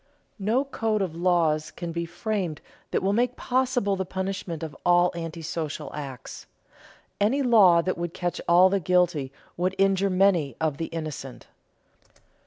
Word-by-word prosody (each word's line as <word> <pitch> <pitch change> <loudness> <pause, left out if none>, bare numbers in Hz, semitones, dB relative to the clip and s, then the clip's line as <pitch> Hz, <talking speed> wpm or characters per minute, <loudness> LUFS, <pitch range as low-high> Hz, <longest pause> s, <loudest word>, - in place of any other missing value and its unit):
No 225 +8 +1
code 220 -6 -1
of 170 -4 -4
laws 165 -3 +1
can 170 -1 -6
be 170 0 -3
framed 185 -4 -3 0.3
that - - -1
will 195 +1 +2
make 245 +3 +1
possible 250 -5 0
the 190 - -2
punishment 190 -3 -4
of 155 -3 -6
all 175 0 +4
antisocial 165 -2 -5
acts. 135 -4 -8 0.7
Any 255 +8 +2
law 195 -9 +6
that 185 -1 -2
would 170 -1 -4
catch 175 -1 -3
all 175 +2 +7
the 195 +1 +1
guilty 175 -6 +1 0.3
would 185 +2 0
injure 195 0 +2
many 185 -8 +2
of 155 -3 -1
the 165 - -2
innocent. 155 -5 -6
180 Hz, 150 wpm, -26 LUFS, 165-200 Hz, 0.7 s, all